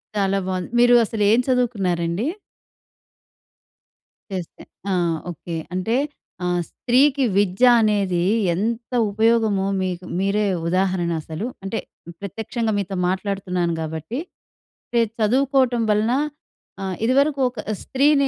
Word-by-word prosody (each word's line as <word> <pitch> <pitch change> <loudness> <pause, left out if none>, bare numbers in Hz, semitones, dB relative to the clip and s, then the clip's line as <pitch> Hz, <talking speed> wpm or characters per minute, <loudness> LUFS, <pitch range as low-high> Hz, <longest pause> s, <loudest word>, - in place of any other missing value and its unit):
చాలా 195 -1 +1
బావుంది. 185 -1 -2
మీరు 245 0 +6
అసలు 215 0 -2
ఏం 225 - +5
చదువుకున్నారండి? 200 -6 0 2.0
చేస్తే. 185 -3 -6 0.3
ఆ! - - +2 0.4
ఓకే. 170 +1 -7 0.2
అంటే, 185 +6 0 0.5
ఆహ్, 175 0 +1
స్త్రీకి 270 +3 +2
విద్య 200 +4 +3 0.2
అనేదీ 200 -5 +1 0.3
ఎంత 230 +6 -2 0.2
ఉపయోగమో 220 -2 +2
మీకు 185 -1 -3
మీరే 200 +2 +1 0.2
ఉదాహరణ 185 -1 +1
అసలు. 160 +7 -5 0.2
అంటే, 195 +3 -2 0.4
ప్రత్యక్షంగా 220 +3 -3
మీతో 195 0 -3
మాట్లాడుతున్నాను 185 -2 -1
గాబట్టి, 160 - -4 0.7
పె 235 - +4 0.2
చదువుకోటం 255 +2 +2
వలన 210 +2 +2 0.7
ఆహ్, 190 -1 -2
ఇదివరకు 275 +4 +3
ఒక 245 -3 -11 0.2
స్త్రీనీ 280 +1 +3
205 Hz, 105 wpm, -22 LUFS, 185-240 Hz, 2.0 s, మీరు